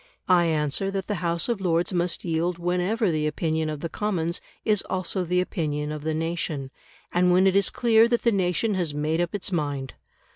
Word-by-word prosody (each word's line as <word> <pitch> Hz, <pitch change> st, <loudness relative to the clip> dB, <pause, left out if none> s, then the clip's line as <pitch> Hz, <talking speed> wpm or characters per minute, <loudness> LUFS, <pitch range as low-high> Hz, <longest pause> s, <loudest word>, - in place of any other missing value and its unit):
I 180 Hz, -2 st, +5 dB
answer 155 Hz, +4 st, 0 dB
that 195 Hz, -1 st, -3 dB
the 205 Hz, -4 st, -3 dB
House 170 Hz, -1 st, 0 dB
of 235 Hz, -5 st, -1 dB
Lords 175 Hz, 0 st, +1 dB
must 175 Hz, 0 st, -1 dB
yield 170 Hz, +1 st, 0 dB
whenever 180 Hz, +4 st, 0 dB
the 155 Hz, -1 st, 0 dB
opinion 160 Hz, +1 st, -1 dB
of 150 Hz, -2 st, -5 dB
the 170 Hz, -, -2 dB
Commons 175 Hz, -5 st, -2 dB, 0.2 s
is 210 Hz, -3 st, +3 dB
also 185 Hz, 0 st, -1 dB
the 180 Hz, +1 st, +1 dB
opinion 150 Hz, -5 st, -2 dB
of 150 Hz, -1 st, -5 dB
the 160 Hz, 0 st, -1 dB
nation, 160 Hz, -4 st, -3 dB, 0.4 s
and 180 Hz, +1 st, +3 dB
when 185 Hz, +2 st, +5 dB
it 190 Hz, 0 st, +3 dB
is 200 Hz, -1 st, +4 dB
clear 230 Hz, -1 st, +4 dB
that 240 Hz, 0 st, 0 dB
the 235 Hz, -, +4 dB
nation 195 Hz, +2 st, +1 dB
has 170 Hz, -6 st, -1 dB
made 155 Hz, +3 st, 0 dB
up 175 Hz, +3 st, -2 dB
its 195 Hz, 0 st, -3 dB
mind. 145 Hz, -6 st, -2 dB
175 Hz, 205 wpm, -25 LUFS, 160-190 Hz, 0.4 s, I